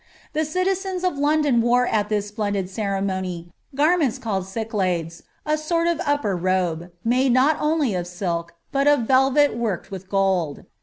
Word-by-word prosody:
The 310 +1 0
citizens 370 +2 -1
of 360 -6 0
London 290 -4 +3
wore 245 +2 +3
at 210 -3 0
this 210 -1 -1
splendid 205 -3 -2
ceremony 190 -4 -3 0.2
garments 295 -4 +2
called 200 -7 -3
cyclades, 185 -6 -2 0.2
a 305 0 +1
sort 335 +2 0
of 340 0 0
upper 290 -9 +1
robe, 175 -2 -1 0.2
made 250 +2 +3
not 275 +5 +4
only 300 -6 +1
of 175 -1 -2
silk, 175 -2 -3 0.2
but 275 +1 +1
of 290 -3 +5
velvet 265 +3 +3
worked 225 -7 -3
with 190 -1 -8
gold. 190 -7 0
225 Hz, 155 wpm, -23 LUFS, 190-290 Hz, 0.2 s, of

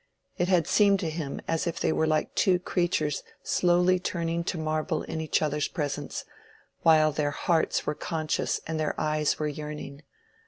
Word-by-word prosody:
It 175 - 0
had 180 -4 +3
seemed 200 -2 +4
to 160 - -2
him 155 -3 -4
as 165 +1 0
if 170 - -2
they - - +1
were 160 - +1
like 155 -1 0
two 185 -3 +3
creatures 175 -5 0 0.2
slowly 180 +1 +3
turning 170 -2 -2
to 180 - -2
marble 155 0 -1
in 160 - -4
each 160 0 +1
other's 150 -1 0
presence, 145 -5 -4 0.6
while 155 -1 +5
their 145 0 0
hearts 160 +3 0
were 150 - 0
conscious 155 0 -1
and 160 0 -3
their 155 - -1
eyes 155 -1 +1
were 155 - -1
yearning. 150 -1 -6
160 Hz, 170 wpm, -27 LUFS, 150-175 Hz, 0.6 s, while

